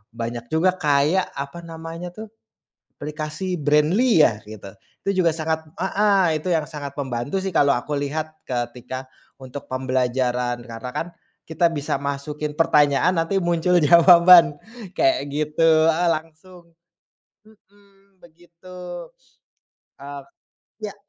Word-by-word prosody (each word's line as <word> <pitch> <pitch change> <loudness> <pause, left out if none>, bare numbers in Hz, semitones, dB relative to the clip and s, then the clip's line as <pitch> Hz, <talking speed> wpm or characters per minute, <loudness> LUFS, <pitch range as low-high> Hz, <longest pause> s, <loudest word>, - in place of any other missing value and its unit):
Banyak 115 0 -5
juga 160 +7 +2
kayak 150 +5 +1
apa 140 +5 -6
namanya 165 +2 -8
tuh, 220 0 -9 0.6
aplikasi 155 +4 -5
Brainly 155 - +3
ya, 110 -7 +3
gitu. 105 -2 -10 0.3
Itu 200 - -1
juga 165 -3 +3
sangat 160 0 -3 0.2
heeh, 190 -5 +2
itu 155 - -12
yang 160 - +1
sangat 145 -2 -7
membantu 140 +6 -3
sih, 195 - -2
kalau 140 -5 +3
aku 145 +4 -3
lihat 155 +2 -4
ketika 125 +1 -5 0.3
untuk 130 +2 -9
pembelajaran. 125 -1 -1
Karena 115 +1 -8
kan, 165 - -2 0.4
kita 160 +2 0
bisa 145 -1 -2
masukin 145 +1 -4
pertanyaan 150 +2 +3
nanti 185 +3 0
muncul 175 0 +2
jawaban 170 -1 +7 0.3
kayak 330 - +1
gitu. 155 +1 +3
Heeh 175 +2 0
langsung, 170 +2 -5 0.7
mhm, 200 -2 -26
begitu. 175 +1 -11 0.9
E 140 - -10 0.8
ya. - - -10
155 Hz, 120 wpm, -22 LUFS, 140-175 Hz, 0.9 s, jawaban